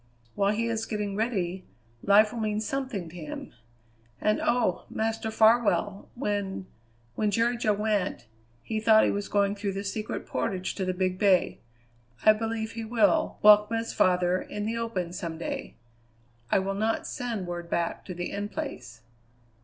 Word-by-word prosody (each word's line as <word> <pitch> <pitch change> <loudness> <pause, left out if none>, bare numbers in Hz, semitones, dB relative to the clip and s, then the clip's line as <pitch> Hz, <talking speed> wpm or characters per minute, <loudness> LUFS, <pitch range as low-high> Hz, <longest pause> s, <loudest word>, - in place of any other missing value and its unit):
While 200 +1 +2
he 230 +2 -1
is 225 -1 -2
getting 210 -2 -3
ready, 190 -5 -1 0.4
life 210 +2 +5
will 235 - -4
mean 215 -1 0
something 245 -5 -3
to 170 - -14
him. 155 -4 -7 0.7
And 215 - +1
oh! 235 -7 +1
Master 225 0 -2
Farwell, 220 -2 +3
when 205 -6 -2 0.5
when 210 - 0
Jerry 230 +4 +2
Jo 225 -3 +1
went, 205 - -1 0.4
he 220 - -2
thought 220 0 +6
he - - +3
was 205 0 -3
going 200 -1 +2
through 200 -1 -3
the 195 +1 -4
Secret 210 +2 -4
Portage 185 -1 -2
to 190 - -3
the 185 - 0
Big 185 0 -1
Bay. 195 -3 +3 0.7
I 215 - +9
believe 225 0 -3
he 230 0 -5
will 240 +8 +2
welcome 210 +1 +7
his 230 0 -3
father 180 0 +2
in 210 0 -5
the 225 +2 -2
open 200 -7 -3
some 170 -3 -5
day. 165 - -5 0.7
I - - +4
will 195 +1 0
not 220 +3 -1
send 230 -6 -3
word 175 -1 -5
back 170 0 -1
to 180 - -6
the 175 0 -4
In 205 +1 -3
Place." 215 - -6
210 Hz, 170 wpm, -27 LUFS, 190-225 Hz, 0.7 s, I